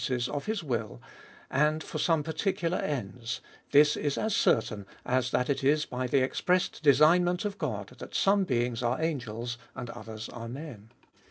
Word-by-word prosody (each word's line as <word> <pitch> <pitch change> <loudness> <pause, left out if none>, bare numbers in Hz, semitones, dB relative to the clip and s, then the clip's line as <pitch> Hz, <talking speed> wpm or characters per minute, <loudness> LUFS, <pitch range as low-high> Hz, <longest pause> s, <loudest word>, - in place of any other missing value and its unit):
ses 125 -3 0
of 145 +6 -4
his 215 -4 -1
vviil, 115 - -3 0.5
and 150 +3 +2
for 155 - -5
some 160 -1 +2
particuhir 165 +2 -1
ends; 120 -3 -3 0.3
this 150 +1 +6
is 145 -2 -1
as 220 -1 0
certain, 105 -3 +1 0.2
as 125 0 +1
that 125 +1 +1
it 140 -1 -1
is 150 +2 +3
by 125 0 -3
the 130 +1 +3
express 180 +7 +1
design 155 +4 +5
ment 175 +3 0
of 205 -1 -3
God, - - -3
that - - -9
some 195 0 +4
being 125 -7 +1
s 115 - -5
arc 120 +2 0
angels, 120 -7 -3 0.2
and 125 -2 -5
others 110 -2 -8
are 115 -1 -7
men. 125 -5 -8
135 Hz, 180 wpm, -29 LUFS, 120-160 Hz, 0.5 s, this